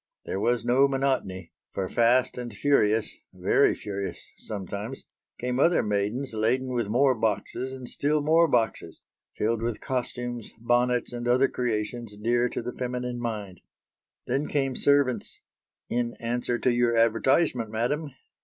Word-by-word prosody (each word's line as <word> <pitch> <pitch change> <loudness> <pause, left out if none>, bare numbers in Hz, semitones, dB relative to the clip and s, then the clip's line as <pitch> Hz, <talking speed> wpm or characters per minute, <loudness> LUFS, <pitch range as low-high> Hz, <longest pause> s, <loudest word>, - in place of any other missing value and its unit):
There 95 - -3
was 120 +1 +1
no 130 +3 +5
monotony, 130 -10 -1 0.2
for 95 -1 -2
fast 120 +4 +3
and 125 -1 -5
furious 110 -2 +2 0.2
very - - +3
furious 100 -2 -6
sometimes 105 +4 -6 0.3
came 125 +1 -2
other 170 +4 +4
maidens 105 +6 -1
laden 125 +4 0
with 120 -4 -1
more 130 +4 +4
boxes 115 +3 -2
and 130 -2 -7
still 150 +4 +1
more 160 +3 +4
boxes, 120 -6 -1 0.3
filled 115 +1 0
with 115 -1 -2
costumes, 120 -2 -4
bonnets, 120 +1 +1
and 120 0 -4
other 130 +3 +4
creations 115 -2 -3
dear 120 +3 +1
to - - -4
the 125 - -4
feminine 125 -1 -3
mind. 105 -6 -5 0.6
Then 140 +3 -1
came 135 -3 0
servants 140 -3 +1 0.5
"in 120 0 -1
answer 120 +1 -2
to 125 - +2
your 120 -1 +2
advertisement, 115 +2 +2
madam." 125 +8 -1
120 Hz, 140 wpm, -27 LUFS, 110-130 Hz, 0.6 s, no